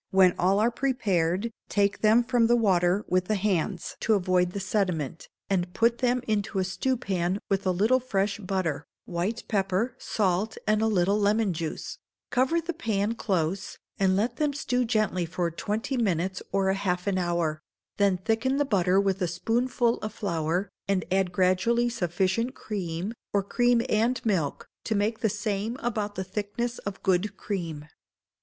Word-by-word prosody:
When 190 -2 +5
all 190 +2 +3
are 230 +3 +3
prepared, 215 -6 0 0.2
take 200 -1 +1
them 220 +3 +5
from 235 -1 +2
the 240 - +4
water 190 -3 +2
with 185 0 +1
the 215 - 0
hands 185 -3 -1
to 220 - +2
avoid 180 -2 +2
the 200 - -3
sediment, 185 -7 -2 0.2
and 180 -2 -1
put 235 +1 +2
them 250 -1 +1
into 210 -2 -1
a 190 - +2
stewpan 190 -3 -1
with 195 -1 0
a - - +4
little 215 +8 +3
fresh 205 -5 -1
butter, 185 -7 -2 0.2
white 180 +6 -2
pepper, 195 +3 0
salt, 195 +1 0
and 215 0 +2
a 220 - +3
little 200 0 +2
lemon 210 -1 +2
juice; 160 -1 -5 0.3
cover 260 +7 +2
the 335 +1 -4
pan 220 - -1
close, 190 -4 -2 0.2
and 190 -1 +3
let 230 +4 0
them 300 -2 +1
stew 250 -4 0
gently 215 -5 +1
for 170 +1 -2
twenty 215 - -2
minutes 190 -4 0
or 190 0 +2
half 180 -2 -1
an 195 -2 +1
hour; 170 -3 -1 0.4
then 200 -2 +3
thicken 225 +8 0
the 290 - +2
butter 190 -6 +3
with 195 -1 0
a 180 - +2
spoonful 235 +6 0
of 215 - -4
flour, 175 0 -2 0.2
and 195 -2 +1
add 190 -1 +2
gradually 190 +7 +2
sufficient 190 +4 0
cream, 185 -1 -4 0.2
or 200 -1 +2
cream 240 +3 +2
and 230 +4 +2
milk, 175 -10 0 0.2
to 220 - -1
make 210 +2 0
the 220 - +1
same 210 +3 -2
about 210 -3 -2
the 190 - -2
thickness 210 +5 -3
of 200 - -6
good 190 +2 +1
cream. 165 -7 -4
200 Hz, 165 wpm, -27 LUFS, 180-225 Hz, 0.4 s, When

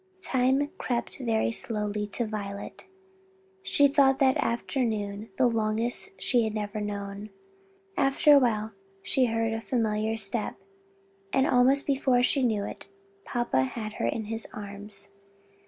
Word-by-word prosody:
Time 265 0 +1
crept 240 +1 -2
by 260 - -6
very 225 -1 +1
slowly 210 -2 -1
to 235 +3 -2
Violet. 205 - -6 0.7
She 285 -6 +4
thought 275 -1 +4
that 265 -1 +4
afternoon 220 -3 -2
the 260 - +4
longest 230 - 0
she 245 -3 +2
had 220 0 -2
ever 210 0 -3
known. 200 0 -5 0.7
After 275 +1 +4
a 285 - +8
while 220 -4 0 0.3
she 260 - +2
heard 225 -1 0
a 225 - -3
familiar 220 -2 0
step, 210 +1 -2 0.8
and 265 0 +3
almost 265 +3 +4
before 265 -3 +2
she 275 +2 +2
knew 220 -5 +1
it - - -8 0.4
papa 240 - 0
had 215 - -4
her - - -1
in 225 - -1
his 225 +1 -3
arms. 200 -1 -5
225 Hz, 140 wpm, -28 LUFS, 210-255 Hz, 0.8 s, a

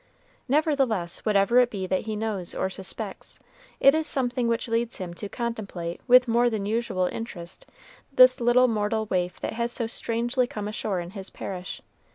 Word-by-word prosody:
Nevertheless, 270 - +1
whatever 210 +4 +4
it 245 -1 +4
be 195 -5 -4
that 185 +1 -1
he 215 - -2
knows 210 -5 -3
or 190 - -1
suspects, 190 -1 -5 0.4
it 275 - +7
is 315 0 0
something 245 -2 +1
which 230 +2 0
leads 230 0 -1
him 180 -2 -6
to 200 +3 -7
contemplate 200 -8 -4
with 250 0 +7
more 240 +1 +3
than 215 -3 -3
usual 210 -4 0
interest 185 -6 -7 0.4
this 255 -2 +6
little 240 +2 +5
mortal 220 -1 0
waif 180 -3 -2
that - - -3
has 235 +1 -1
so 240 -1 -1
strangely 240 +2 0
come 210 -3 -5
ashore 210 -2 -2
in 175 +1 -8
his 195 -2 -6
parish. 180 -2 -7
225 Hz, 175 wpm, -26 LUFS, 195-240 Hz, 0.4 s, it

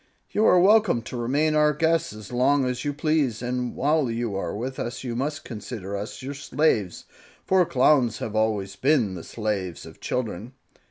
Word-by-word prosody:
You 215 - +2
are 180 - +6
welcome 195 - +4
to 125 - -7
remain 140 +6 +1
our 150 0 +4
guests 165 +2 +1
as 105 +1 -10
long 135 +2 +3
as 125 -1 -2
you 145 - -1
please, 145 -6 0
and 125 0 -2
while 145 -1 +1
you 115 -3 -2
are 90 -3 -3
with 130 +5 -5
us 120 +2 -4
you 120 -2 -4
must 145 +4 -3
consider 105 -3 -6
us 105 +6 -6
your 140 +2 -4
slaves, 140 - 0 0.4
for 190 -1 +4
Clowns 130 -6 +3
have 110 0 -5
always 105 -3 0
been 125 -3 +2
the 85 -3 -7
slaves 100 -6 -3
of - - -13
children." 115 -1 -4
125 Hz, 180 wpm, -25 LUFS, 110-150 Hz, 0.4 s, are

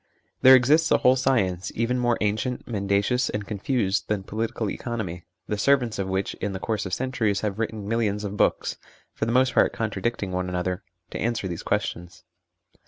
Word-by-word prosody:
There 130 0 +9
exists 150 +6 +4
a - - +5
whole 125 +1 +4
science, 100 -9 0
even 120 +2 0
more 120 -1 +2
ancient, 110 +4 -1
mendacious, 100 +3 +1
and 105 -1 -3
confused, 105 -1 -1
than 105 -2 -1
political 110 +2 -3
economy, 100 -7 -4 0.2
the 105 - -2
servants 125 -3 +2
of 95 - -1
which 95 +1 -1
in 100 - -2
the 95 - -4
course 105 -1 -2
of 90 - -7
centuries 115 -6 -1
have 105 -1 -2
written 110 -2 -3
millions 105 -2 0
of 100 0 -4
books - - +1 0.4
(for - - -2
the 115 - -1
most 130 +2 +3
part - - +3
contradicting 110 -2 -2
one 90 0 -2
another) 90 +1 -2 0.3
to - - -5
answer 115 -4 -1
these 85 -2 -5
questions. 90 +1 -3
105 Hz, 180 wpm, -25 LUFS, 95-120 Hz, 0.4 s, There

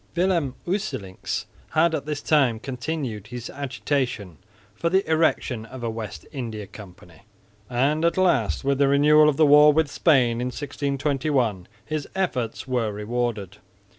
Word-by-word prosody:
Willem 170 -7 +1
Usselincx 130 - -3 0.3
had 160 +1 +4
all - - 0
this 150 0 -5
time 135 -8 +3
continued 125 -4 -4
his 120 +1 -7
agitation 130 - -3 0.4
for 170 +10 -1
the 190 +1 +1
erection 155 -7 +1
of 130 +1 -9
a 115 - -1
West 110 -2 -7
India 115 -7 -5
Company; 95 -4 -14 0.5
and 140 +6 +1
at 170 +2 +2
last, 175 - +2
with 140 0 0
the 140 - +4
renewal 150 +2 +5
of 140 - -1
the 155 - +5
war 150 +1 +7
with 155 -1 +1
Spain 125 -7 +3
in 125 - -1
1621, 140 - -1 0.2
his 155 -2 -3
efforts 130 - -2
were 120 -4 0
rewarded. 105 -2 -3
135 Hz, 145 wpm, -24 LUFS, 115-150 Hz, 0.5 s, war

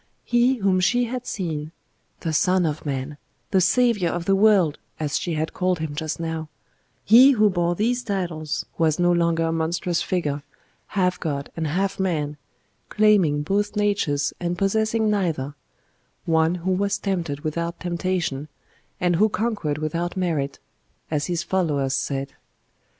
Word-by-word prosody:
He 240 +2 +3
whom 195 -5 +2
she 245 +7 +3
had 250 +1 -4
seen 160 -5 -4 0.5
the 160 - -2
Son 185 +2 +3
of 155 -1 -3
Man, 140 +1 -3 0.3
the 190 - +4
Saviour 195 -1 +3
of 175 -1 -3
the 195 - +3
world, 195 -7 +4 0.2
as 150 -2 -1
she 175 -5 -2
had 155 +1 -2
called 185 -1 0
Him 160 -2 -4
just 155 +1 -3
now 160 -1 -4 0.6
He 255 +6 +8
who 210 -4 +4
bore 175 -1 0
these 240 +6 0
titles 175 -9 -3
was 160 -2 +3
no 175 0 +3
longer 170 -1 +2
a 165 - 0
monstrous 165 +2 -1
figure, 150 -6 -1 0.6
half 180 -1 +2
God 140 -4 -3
and 160 -1 -2
half 195 +5 -1
man, 150 -6 -1 0.5
claiming 195 -9 +3
both 205 +6 0
natures 190 -9 +1
and 175 0 -2
possessing 220 +3 +1
neither; 160 -9 -1 0.7
one 160 +1 +2
who 180 +1 -2
was 200 +2 +1
tempted 175 -8 -2
without 170 +2 -3
temptation, 175 -5 -2 0.5
and 175 -1 +2
who 215 +4 +4
conquered 205 -10 -1
without 165 +4 -3
merit, 155 -7 -1 0.5
as 150 -2 0
his 170 -1 -1
followers 150 -7 0
said. 135 0 -2
175 Hz, 150 wpm, -23 LUFS, 155-195 Hz, 0.7 s, He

